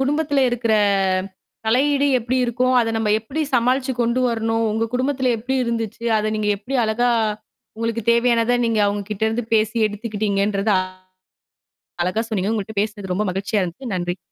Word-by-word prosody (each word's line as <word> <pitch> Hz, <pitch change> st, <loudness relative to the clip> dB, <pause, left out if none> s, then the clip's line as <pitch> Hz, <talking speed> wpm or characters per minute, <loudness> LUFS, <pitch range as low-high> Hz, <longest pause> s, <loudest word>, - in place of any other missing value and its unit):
குடும்பத்துல 285 Hz, 0 st, +1 dB
இருக்கிற 235 Hz, -2 st, 0 dB, 0.9 s
தலையீடு 280 Hz, +5 st, +3 dB
எப்படி 245 Hz, +3 st, -2 dB
இருக்கும்? 250 Hz, +2 st, +1 dB
அதை 225 Hz, -1 st, 0 dB
நம்ப 220 Hz, -1 st, 0 dB
எப்டி 270 Hz, +8 st, -4 dB
சமாளிச்சு 255 Hz, +2 st, +2 dB
கொண்டு 235 Hz, +2 st, +1 dB
வரணும்? 225 Hz, 0 st, 0 dB
உங்க 225 Hz, +1 st, 0 dB
குடும்பத்துல 260 Hz, 0 st, +1 dB
எப்டி 260 Hz, +4 st, -3 dB
இருந்துச்சு? 230 Hz, -1 st, -3 dB
அதை 215 Hz, 0 st, -1 dB
நீங்க 210 Hz, -1 st, -1 dB
எப்டி 245 Hz, +7 st, -4 dB
அழகா, 240 Hz, +3 st, +1 dB, 0.7 s
உங்களுக்குத் 230 Hz, 0 st, -3 dB
தேவையானதை 235 Hz, 0 st, +2 dB
நீங்க 225 Hz, -2 st, +1 dB
அவங்க 205 Hz, 0 st, -1 dB
கிட்ட 210 Hz, 0 st, -5 dB
இருந்து 225 Hz, +2 st, -2 dB
பேசி 220 Hz, +1 st, +1 dB
எடுத்துக்கிட்டீங்கன்றத, 205 Hz, -1 st, -1 dB, 1.3 s
அழகா 200 Hz, +6 st, 0 dB
சொன்னீங்க. 205 Hz, 0 st, -1 dB
உங்கள்ட்ட 215 Hz, -1 st, -4 dB
பேசுனது 205 Hz, -3 st, -4 dB
ரொம்ப 210 Hz, -, 0 dB
மகிழ்ச்சியா 200 Hz, +2 st, -1 dB
இருந்துது. 190 Hz, +6 st, -5 dB
நன்றி! 175 Hz, +1 st, -2 dB
225 Hz, 145 wpm, -21 LUFS, 210-245 Hz, 1.3 s, தலையீடு